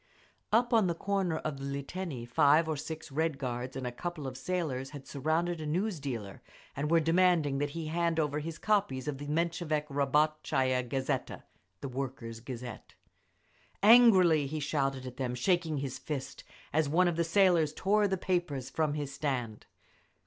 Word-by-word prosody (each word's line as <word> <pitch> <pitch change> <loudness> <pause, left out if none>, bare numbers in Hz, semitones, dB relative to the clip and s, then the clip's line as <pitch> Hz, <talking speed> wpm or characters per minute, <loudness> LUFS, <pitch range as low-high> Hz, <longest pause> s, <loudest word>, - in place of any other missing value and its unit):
Up 240 +2 +3
on 220 -5 +5
the 170 - -1
corner 190 -3 -1
of 155 -3 -4
the - - -7
Liteiny, 140 -1 -4
five 150 +4 +4
or 160 - -1
six 160 +1 -7
Red 160 0 0
Guards 125 -1 -4
and 135 -1 -4
a 125 - -2
couple 160 +3 -5
of 130 -1 -5
sailors 140 -6 -2
had 140 -1 -10
surrounded 160 +4 -1
a 155 - -4
news 180 +3 -1
dealer 115 -9 -5 0.3
and 145 +2 -2
were 165 0 +5
demanding 165 -4 +3
that 145 +1 0
he 165 - -3
hand 165 +1 0
over 150 -1 0
his 165 +1 -5
copies 195 -12 0
of 140 -2 -3
the 145 - -6
Menshevik 160 -1 0
Rabot 150 +2 +1
chaya 130 -3 +1
Gazeta 130 +2 -3 0.4
(Workers' 130 -4 -5
Gazette). 120 -1 -8 0.9
Angrily 190 - +7
he 155 +3 -3
shouted 135 -3 -1
at 125 -1 -8
them, 125 -2 -2
shaking 160 +3 +1
his 135 -2 -4
fist, 140 -4 -5 0.3
as 155 -1 +2
one 180 +4 +4
of 175 - 0
the 170 - +1
sailors 170 -3 +3
tore 205 +6 +2
the 190 -1 -1
papers 175 -9 -2
from 155 -2 0
his 145 -2 -4
stand. 130 -7 -3
150 Hz, 170 wpm, -31 LUFS, 135-170 Hz, 0.9 s, Angrily